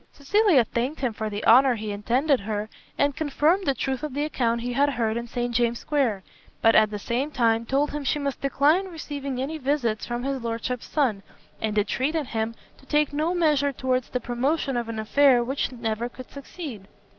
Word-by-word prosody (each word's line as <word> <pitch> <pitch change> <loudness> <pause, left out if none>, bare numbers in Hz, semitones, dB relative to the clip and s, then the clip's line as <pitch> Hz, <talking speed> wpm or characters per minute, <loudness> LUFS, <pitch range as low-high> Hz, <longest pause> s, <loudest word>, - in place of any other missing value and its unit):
Cecilia 350 - +3
thanked 250 +7 -3
him 250 -4 0
for 215 0 -3
the 205 0 -5
honour 255 +2 +6
he 215 -1 -4
intended 250 +7 +1
her, 210 +1 -4 0.3
and 285 -1 +2
confirmed 315 +5 +1
the 275 - +2
truth 265 -1 -2
of 300 -3 -5
the 290 +1 0
account 235 -6 0
he 245 +1 -3
had 285 +3 +3
heard 230 -5 -1
in 235 0 -4
St 240 0 -3
James' 235 0 +1
square, 245 -11 0 0.4
but 225 - +5
at 215 0 +5
the 210 - -4
same 240 +7 -2
time 230 -4 +1
told 280 +2 +1
him 295 0 -4
she 280 - 0
must 280 -2 -3
decline 295 +7 +2
receiving 285 -6 -5
any 300 +4 -3
visits 255 -6 -1
from 240 0 -3
his 270 -1 -2
lordship's 235 +2 -3
son, 250 -10 0 0.4
and 215 -1 -1
entreated 275 +9 0
him 225 -1 -3 0.2
to - - -20
take 295 0 +1
no 315 +5 0
measure 300 -5 +2
towards 255 -1 -1
the 250 - -2
promotion 265 +4 -1
of 235 -1 -2
an 225 - -4
affair 245 +3 +4
which 270 +3 -2
never 235 -1 -3
could 255 +1 -12
succeed. 280 - -8
255 Hz, 200 wpm, -25 LUFS, 230-285 Hz, 0.4 s, honour